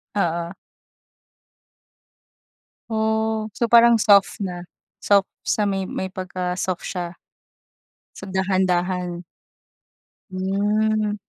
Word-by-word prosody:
Oo. 170 Hz, -2 st, -1 dB, 2.3 s
Oh, 220 Hz, 0 st, 0 dB
so 235 Hz, -, +1 dB
parang 235 Hz, 0 st, +6 dB
soft 200 Hz, -2 st, +4 dB
na, 175 Hz, -1 st, -5 dB, 0.4 s
soft 200 Hz, -1 st, +4 dB, 0.2 s
sa 210 Hz, -, 0 dB
may 195 Hz, -1 st, -2 dB
may -, -, -3 dB
pagka-soft 185 Hz, -1 st, -3 dB
siya. 175 Hz, -2 st, -5 dB, 1.0 s
So, -, -, -8 dB
dahan-dahan. 185 Hz, -2 st, 0 dB, 1.1 s
Hmm. 210 Hz, +3 st, 0 dB
195 Hz, 80 wpm, -22 LUFS, 180-215 Hz, 2.3 s, parang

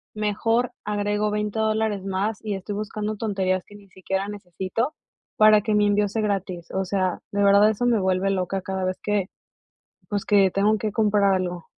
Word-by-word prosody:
mejor 225 Hz, +3 st, 0 dB
agrego 210 Hz, 0 st, 0 dB
20 210 Hz, +1 st, -2 dB
dólares 220 Hz, -2 st, 0 dB
más 195 Hz, +3 st, -1 dB
y 210 Hz, -2 st, -3 dB
estoy 195 Hz, +2 st, -6 dB
buscando 215 Hz, 0 st, -4 dB
tonterías 190 Hz, -4 st, -1 dB
que 205 Hz, -, -15 dB
ni 200 Hz, -1 st, -16 dB
siquiera 190 Hz, +1 st, -3 dB
necesito, 195 Hz, -, -3 dB, 0.4 s
para 215 Hz, -1 st, +6 dB
que 215 Hz, 0 st, 0 dB
mi 210 Hz, 0 st, +4 dB
envío 205 Hz, 0 st, +2 dB
sea 220 Hz, +3 st, -2 dB
gratis. 185 Hz, -4 st, -2 dB
O 190 Hz, 0 st, -1 dB
sea, 185 Hz, -2 st, -1 dB
de 205 Hz, 0 st, +1 dB
verdad 200 Hz, +1 st, +6 dB
eso 220 Hz, +3 st, -1 dB
me 235 Hz, -3 st, +3 dB
vuelve 190 Hz, +1 st, +1 dB
loca 190 Hz, 0 st, -1 dB
cada 190 Hz, 0 st, -3 dB
vez 185 Hz, 0 st, -2 dB
que, 205 Hz, -3 st, 0 dB, 0.8 s
pues, 205 Hz, -1 st, -2 dB
que 200 Hz, -4 st, +4 dB
tengo 210 Hz, +2 st, +2 dB
que 215 Hz, 0 st, -2 dB
comprar 205 Hz, -2 st, +3 dB
algo. 180 Hz, -2 st, -3 dB
205 Hz, 185 wpm, -24 LUFS, 190-215 Hz, 0.8 s, para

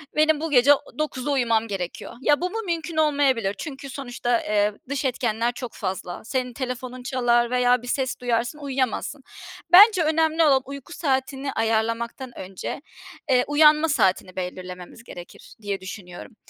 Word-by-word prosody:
Benim 310 Hz, 0 st, +3 dB
bu 325 Hz, -1 st, -3 dB
gece 275 Hz, +1 st, +6 dB
o 285 Hz, -, -2 dB, 0.2 s
21.00'de 295 Hz, -2 st, -2 dB
uyumam 230 Hz, -4 st, +1 dB
gerekiyor." 190 Hz, -1 st, -5 dB
Ya, 290 Hz, +3 st, +3 dB
bu 360 Hz, -, 0 dB
mu 445 Hz, -, -5 dB
mümkün 335 Hz, -2 st, -3 dB
olmayabilir 275 Hz, -9 st, +2 dB
çünkü 275 Hz, -3 st, -7 dB
sonuçta, 245 Hz, -3 st, -2 dB
eee, 210 Hz, 0 st, +1 dB, 0.2 s
dış 280 Hz, 0 st, -2 dB
etkenler 235 Hz, -2 st, 0 dB
çok 245 Hz, -1 st, -7 dB
fazla. 185 Hz, -2 st, -5 dB
Senin 250 Hz, 0 st, -2 dB
telefonun 255 Hz, 0 st, -5 dB
çalar 240 Hz, -2 st, +1 dB
veya 250 Hz, -1 st, +3 dB
bir 245 Hz, -, -10 dB
ses 260 Hz, 0 st, -2 dB
duyarsın, 240 Hz, +3 st, -1 dB
uyuyamazsın. 270 Hz, 0 st, -2 dB, 0.5 s
Bence 395 Hz, -1 st, +8 dB
önemli 320 Hz, +1 st, +2 dB
olan, 275 Hz, -4 st, +4 dB
uyku 280 Hz, +4 st, -9 dB
saatini 270 Hz, -2 st, -2 dB
ayarlamaktan 230 Hz, +3 st, -1 dB
önce, 190 Hz, +7 st, -6 dB, 0.5 s
eee, 250 Hz, -1 st, +4 dB
uyanma 305 Hz, +2 st, +5 dB
saatini 190 Hz, -8 st, +1 dB
belirlememiz 180 Hz, +2 st, -7 dB
gerekir 175 Hz, -7 st, -12 dB
diye 200 Hz, -2 st, -3 dB
düşünüyorum. 185 Hz, +1 st, -9 dB
255 Hz, 150 wpm, -24 LUFS, 225-290 Hz, 0.5 s, Bence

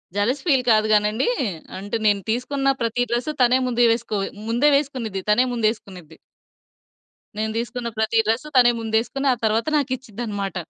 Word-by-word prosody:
Jealous 240 Hz, +7 st, 0 dB
feel 270 Hz, -7 st, +3 dB
కాదు 215 Hz, 0 st, +3 dB
గానండీ! 210 Hz, -, +2 dB, 0.5 s
అంటే 205 Hz, +4 st, -3 dB
నేను 205 Hz, -1 st, +3 dB
తీసుకున్న 275 Hz, +4 st, 0 dB
ప్రతి 230 Hz, +1 st, 0 dB
డ్రెస్ 240 Hz, +5 st, -1 dB
తనే 250 Hz, +1 st, +5 dB
ముందే 240 Hz, -1 st, +2 dB
వేసుకో 230 Hz, -2 st, -2 dB, 0.3 s
ముందే 240 Hz, +6 st, +3 dB
వేసుకునిద్ది, 255 Hz, -9 st, -2 dB
తనే 210 Hz, +4 st, +4 dB
ముందేసుకునిద్ది. 200 Hz, -8 st, -3 dB, 1.2 s
నేను 220 Hz, 0 st, -1 dB
దీసుకున్న 240 Hz, 0 st, -3 dB
ప్రతి 220 Hz, +1 st, +1 dB
డ్రెస్ 225 Hz, +7 st, 0 dB
తనే 240 Hz, -1 st, +6 dB
ముందేసుకొని 225 Hz, +5 st, -1 dB
ఆ -, -, -2 dB
తర్వాత 220 Hz, +4 st, +1 dB
నాకిచ్చిద్దనమాట. 230 Hz, -7 st, -4 dB
230 Hz, 140 wpm, -22 LUFS, 215-250 Hz, 1.2 s, తనే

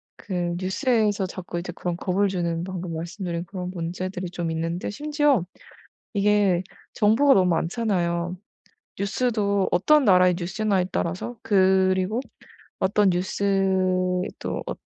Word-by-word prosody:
그 175 Hz, -3 st, -3 dB
뉴스에서 205 Hz, +1 st, +1 dB
자꾸 180 Hz, -2 st, -6 dB
이제 175 Hz, 0 st, -6 dB
그런 175 Hz, -1 st, -3 dB
겁을 195 Hz, +2 st, +1 dB
주는 170 Hz, -2 st, -2 dB
방금 180 Hz, -2 st, -5 dB
말씀드린 170 Hz, +1 st, -4 dB
그런 180 Hz, 0 st, -6 dB
문제들이 180 Hz, +1 st, -4 dB
좀 170 Hz, -2 st, -3 dB
있는데 165 Hz, +2 st, -3 dB
심지어 295 Hz, -, +1 dB, 0.7 s
이게 200 Hz, -3 st, +3 dB, 0.3 s
정보가 230 Hz, +6 st, +4 dB
너무 185 Hz, -4 st, +3 dB
많잖아요. 175 Hz, -1 st, -1 dB, 0.6 s
뉴스도 200 Hz, -1 st, 0 dB
어떤 300 Hz, +10 st, +4 dB
나라의 180 Hz, -4 st, +5 dB
뉴스냐에 190 Hz, +1 st, 0 dB
따라서 185 Hz, +8 st, -3 dB
그리고 190 Hz, 0 st, +3 dB, 0.6 s
어떤 195 Hz, +1 st, +3 dB
뉴스도 185 Hz, -1 st, +1 dB, 0.4 s
어 -, -, -2 dB
185 Hz, 280 characters per minute, -24 LUFS, 175-205 Hz, 0.7 s, 나라의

